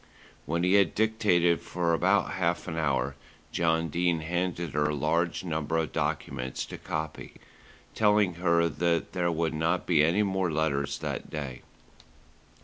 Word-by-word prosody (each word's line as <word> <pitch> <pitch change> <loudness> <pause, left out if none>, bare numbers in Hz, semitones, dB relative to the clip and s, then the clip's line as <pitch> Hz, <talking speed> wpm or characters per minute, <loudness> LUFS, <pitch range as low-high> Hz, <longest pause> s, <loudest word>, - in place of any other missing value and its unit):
When 85 +1 0
he 90 +1 +3
had 100 -4 +4
dictated 105 -6 +2
for 85 -1 -1
about 80 - +2
half - - -1
an 80 - -4
hour, 70 -4 0 0.4
John 80 -1 +1
Dene 85 +1 +1
handed 85 0 -2
her 75 +1 +1
a 75 - -1
large 85 +5 0
number 80 -2 -2
of 80 -2 -1
documents 65 +1 -3
to - - -9
copy, 80 -1 -5 0.6
telling 105 -3 +3
her 85 -1 +3
that 85 +2 -1
there 90 -2 +1
would 80 0 -1
not 80 +3 0
be 80 -4 +4
any 85 +7 +3
more 95 -3 0
letters 75 -3 0
that - - -5
day. 70 -5 -5
85 Hz, 150 wpm, -28 LUFS, 80-90 Hz, 0.6 s, had